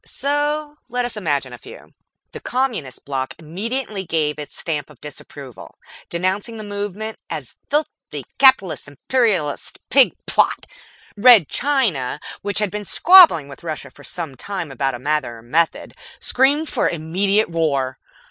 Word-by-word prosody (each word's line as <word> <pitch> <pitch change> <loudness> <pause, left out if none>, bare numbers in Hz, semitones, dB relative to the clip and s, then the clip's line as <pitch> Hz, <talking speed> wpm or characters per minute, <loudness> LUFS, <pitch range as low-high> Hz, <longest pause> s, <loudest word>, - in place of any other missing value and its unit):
So 295 +1 -2
let 245 0 -1
us 240 - -4
imagine 145 -10 -1
a 120 - -10
few. - - -13 0.4
The - - -8
Communist 240 - -3
Block 135 -2 -3
immediately 200 - -4
gave 155 -4 -1
its 145 - -8
Stamp 150 -4 -3
of 150 -5 -17
Disapproval, 140 -3 -10 0.3
denouncing 190 +6 -1
the 215 - -7
movement 205 +1 -5
as - - -6
a - - -43 0.4
filthy - - -7
Capitalist 230 - +4
Imperialist 175 - -1
Pig 270 -2 +6
plot. - - +2 0.5
Red 220 - +7
China, 220 - 0 0.2
which 205 0 -2
had 210 -3 +1
been 210 +1 -4
squabbling 330 - +7
with 140 +4 -12
Russia 155 -4 -5
for - - -17
some 165 -6 -5
time 175 +1 -5
about 135 -1 -1
a - - -5
matter 145 -2 -1
of 115 - -16
method, 165 +7 0 0.3
screamed 285 +5 +2
for - - 0
immediate 185 +5 0
war. 140 -6 0
180 Hz, 145 wpm, -20 LUFS, 145-230 Hz, 0.5 s, Red